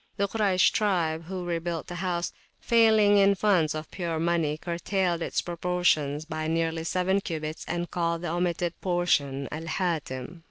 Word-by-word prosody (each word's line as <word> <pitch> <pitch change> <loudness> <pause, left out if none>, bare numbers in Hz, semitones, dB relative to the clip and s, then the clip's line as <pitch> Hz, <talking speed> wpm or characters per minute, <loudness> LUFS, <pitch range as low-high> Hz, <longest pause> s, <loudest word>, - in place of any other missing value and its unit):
The 200 - +1
Kuraysh 200 -3 +3
tribe, 170 -6 0
who 180 0 -5
rebuilt 170 -1 -2
the 175 - -7
house, 175 -2 -1 0.3
failing 220 -3 +5
in 200 0 +5
funds 180 -7 +2
of 155 0 -6
pure 170 -3 -3
money, 165 -3 +1
curtailed 175 +1 -1
its - - -1
proportions 170 -4 0
by 155 -1 -4
nearly 165 0 0
seven 185 +3 +1
cubits 155 -3 -4
and 175 0 -3
called 170 -1 -1
the 175 - -2
omitted 175 0 -1
portion 145 -7 +1
Al 160 +2 -5
Hatim. 160 -4 -3
170 Hz, 155 wpm, -27 LUFS, 160-185 Hz, 0.3 s, failing